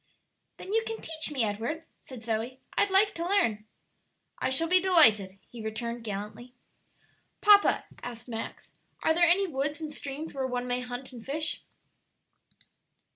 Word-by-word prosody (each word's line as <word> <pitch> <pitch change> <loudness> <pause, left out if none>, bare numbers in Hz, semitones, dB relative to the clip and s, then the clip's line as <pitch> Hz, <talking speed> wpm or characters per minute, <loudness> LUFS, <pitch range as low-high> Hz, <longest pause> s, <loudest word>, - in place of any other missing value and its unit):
"Then 390 - -7
you 450 - +3
can 450 0 -5
teach 315 -1 -1
me, 265 -5 +1
Edward," 225 +10 -3 0.2
said 250 -4 -10
Zoe; 230 +3 -3 0.2
"I'd 405 - +2
like 390 +2 +4
to 335 - -4
learn." 225 - +1 0.7
"I - - 0
shall 270 +6 +3
be 365 +2 +5
delighted," 220 - +5
he 235 - -10
returned, 235 +2 -4
gallantly. 215 +4 -7 0.8
"Papa," 410 -1 +5 0.2
asked 240 -1 -8
Max, 225 -2 -7 0.3
"are 320 - +4
there 340 +1 +4
any 390 +3 +4
woods 290 -2 -3
and 310 -2 -6
streams 290 +3 -6
where 265 -2 -2
one 250 -1 -3
may 245 0 0
hunt 250 +1 -7
and 235 -2 -10
fish?" 305 +5 -2
265 Hz, 155 wpm, -28 LUFS, 230-330 Hz, 0.8 s, be